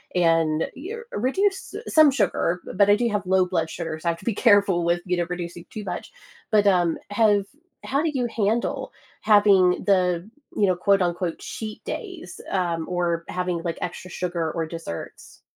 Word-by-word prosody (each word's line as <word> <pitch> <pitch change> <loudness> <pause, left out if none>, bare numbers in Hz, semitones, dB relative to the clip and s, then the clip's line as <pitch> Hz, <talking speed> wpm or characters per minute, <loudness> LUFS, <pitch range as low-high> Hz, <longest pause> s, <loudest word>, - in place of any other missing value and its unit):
and, 165 -2 +3 0.3
er 465 +1 -7
reduce 385 - 0
s - - -7
some 310 -2 +7
sugar, 180 -9 0
but 200 +1 +4
I 205 - +7
do 235 +2 0
have 205 -2 -2
low 185 0 +3
blood 165 -3 -1
sugar, 160 -1 -5
so 170 - -6
I - - +4
have 165 - -12
to - - -14
be 230 - +1
careful 200 -5 +4
with, 170 +1 +1
you 180 -1 0
know, 175 - 0
reducing 175 -1 -6
too 215 - -7
much. - - -6 0.4
But, 210 -2 +3
um, 175 -4 +3
have 205 -1 +3 0.4
how 275 +2 0
do 325 - +1
you 255 -3 0
handle 225 +1 -1 0.3
having 200 -4 +4
the, 180 -1 +1 0.3
you 205 - +3
know, 185 -2 +2
quote 195 +1 +3
unquote, 175 -1 -1
"cheat 215 -1 -7
days," 375 -4 -7
um, 170 -4 -1
or 175 -2 -1
having, 180 -2 -2
like, 170 -2 -3
extra 185 - -5
sugar 170 -3 -2
or 165 -1 -2
desserts? 160 - -8
185 Hz, 185 wpm, -24 LUFS, 170-210 Hz, 0.4 s, some